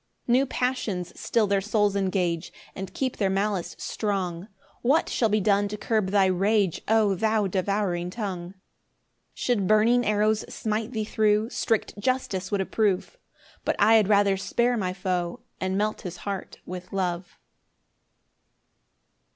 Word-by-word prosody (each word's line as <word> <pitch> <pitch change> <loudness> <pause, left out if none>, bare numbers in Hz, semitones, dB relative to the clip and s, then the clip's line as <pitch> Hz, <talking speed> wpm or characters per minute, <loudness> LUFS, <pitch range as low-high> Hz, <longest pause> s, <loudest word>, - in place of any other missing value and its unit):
6 - - -15
New 260 +3 +4
passions 225 -10 -2
still 225 -2 +2
their 200 -1 +1
souls 205 0 +1
engage, 185 -4 0 0.2
And 190 -1 -6
keep 260 -2 -2
their 195 -3 +1
malice 195 -1 -1
strong: 190 -4 -3 0.3
What 275 +7 +2
shall 225 - +1
be 215 +1 +2
done 205 0 +2
to 210 +1 -5
curb 215 -2 0
thy 200 -1 +4
rage, 195 0 +1
O 220 -2 +3
thou 215 +2 +1
devouring 190 -2 -1
tongue! 185 -3 -5 0.8
6 - - -11
Should 215 -7 +1
burning 225 +4 +4
arrows 215 0 +2
smite 220 +2 -2
thee 220 -2 -1
thro', 215 +1 +2
Strict 225 -4 -1
justice 205 -5 -1
would 200 -2 0
approve; 210 - 0 0.4
But - - 0
I 210 +2 +5
had 220 -3 +5
rather 200 -2 +4
spare 240 +5 +1
my 190 -5 -1
foe, 180 -2 -2 0.2
And 190 +1 -1
melt 215 +1 -1
his 180 -2 -6
heart 200 -2 -5
with 180 0 -8
love. 180 -2 -3
205 Hz, 150 wpm, -26 LUFS, 185-220 Hz, 0.8 s, I